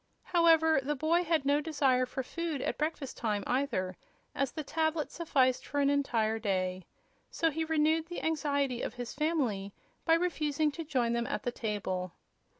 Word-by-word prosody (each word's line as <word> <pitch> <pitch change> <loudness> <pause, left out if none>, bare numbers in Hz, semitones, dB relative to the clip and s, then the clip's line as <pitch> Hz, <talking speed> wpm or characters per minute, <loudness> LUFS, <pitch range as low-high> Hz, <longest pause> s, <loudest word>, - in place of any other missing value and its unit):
However, 325 -3 +4
the 295 +3 -1
boy 325 +5 +2
had 320 -4 +1
no 285 +1 +3
desire 270 -5 +2
for 265 +1 -4
food 335 +1 -3
at - - -2
breakfast 300 -3 -3
time, 210 -3 -1
either, 215 -9 -1 0.4
as 275 -1 -1
the 310 - -5
tablet 315 +1 -1
sufficed 265 -7 +1
for 285 - -3
an 280 0 +3
entire 225 -6 +1
day. 185 -3 -1 0.4
So 325 -1 +1
he 320 +2 -1
renewed 320 +1 +2
the 350 - -6
anxiety 285 -5 0
of - - -4
the 245 0 -4
family 245 -10 -1 0.3
by 325 - +5
refusing 310 -3 0
to 330 +3 -6
join 255 -6 0
them 235 0 -1
at - - -3
the 245 - -1
table. 190 -6 -3
285 Hz, 170 wpm, -31 LUFS, 240-320 Hz, 0.4 s, by